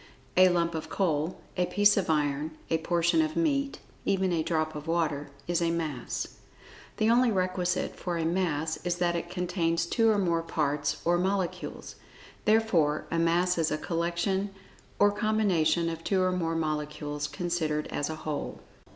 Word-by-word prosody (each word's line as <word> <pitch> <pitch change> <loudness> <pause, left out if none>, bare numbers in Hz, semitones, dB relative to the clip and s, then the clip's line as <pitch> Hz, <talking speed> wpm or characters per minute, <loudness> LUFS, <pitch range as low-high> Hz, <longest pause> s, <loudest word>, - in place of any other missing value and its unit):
A 185 0 +7
lump 170 -1 +1
of 160 - -5
coal; 165 -3 0 0.2
a 180 -1 +1
piece 205 +1 +4
of 195 -5 0
iron; 150 0 0
a 160 - +3
portion 175 - +2
of 315 0 -1
meat, 280 -4 +1 0.3
even 190 -2 +1
a 165 - +1
drop 155 -1 -1
of 150 +1 -7
water, 155 -4 0 0.2
is 175 0 +1
a 170 - +2
Mass. 155 -7 -3 0.6
The 215 +1 +3
only 245 0 +4
requisite 185 -2 0
for 175 -2 -3
a 165 - -1
Mass, 160 -3 0
is 175 0 -2
that 175 -1 0
it 170 0 -3
contains 175 -2 0
two 225 +6 +2
or 215 - +3
more 170 -4 +1
parts 150 -3 -1
or 175 +1 +3
molecules. 190 -1 -2 0.5
Therefore 200 -9 +3
a 165 - +1
Mass 175 +2 +2
is 160 -1 +2
a 155 - -1
collection 170 +5 -1 0.5
or 205 0 +5
combination 205 -6 +2
of 165 0 -4
two 190 -2 +2
or 185 - +2
more 165 -3 -1
molecules, 150 -2 -2
considered 160 -3 -1
as 145 - -2
a 160 - -3
whole. 150 -2 -3
170 Hz, 170 wpm, -28 LUFS, 160-185 Hz, 0.6 s, A